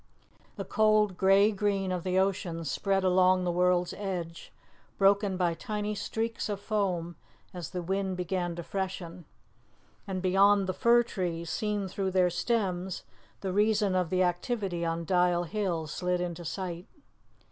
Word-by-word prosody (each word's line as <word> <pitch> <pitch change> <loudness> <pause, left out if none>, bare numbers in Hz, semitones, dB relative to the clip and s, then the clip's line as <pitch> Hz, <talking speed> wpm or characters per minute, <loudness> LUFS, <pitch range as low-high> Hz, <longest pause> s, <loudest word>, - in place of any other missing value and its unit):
The - - -5
cold 215 -2 +3
grey 195 +3 +5
green 200 -2 0
of 180 -2 -2
the 185 0 0
ocean 185 -3 0
spread 195 +7 0
along 185 0 +4
the 175 - 0
world's 180 0 +2
edge, 180 -4 -5 0.5
broken 195 -1 +3
by 175 -2 +1
tiny 210 +4 -3
streaks 225 +2 -3
of 205 -1 -2
foam 185 -6 -2 0.4
as 175 -4 -6
the 180 -2 -4
wind 190 +1 -1
began 180 -1 -2
to 170 - -6
freshen, 180 -1 -5 0.8
and 190 -1 -3
beyond 195 +2 +4
the 185 - -2
fir 240 +3 +4
trees, 170 -6 -4
seen 210 -3 -1
through 190 +1 -2
their 180 -1 +2
stems, 190 -2 -1 0.4
the 190 -2 -3
reason 210 -1 +2
of 180 -3 +1
the 185 +1 +2
activity 180 0 -1
on 165 0 -2
Dial 180 0 +2
Hill 175 -3 -2
slid 180 +3 -2
into 175 -1 -4
sight. 175 +2 -5
185 Hz, 150 wpm, -29 LUFS, 175-200 Hz, 0.8 s, grey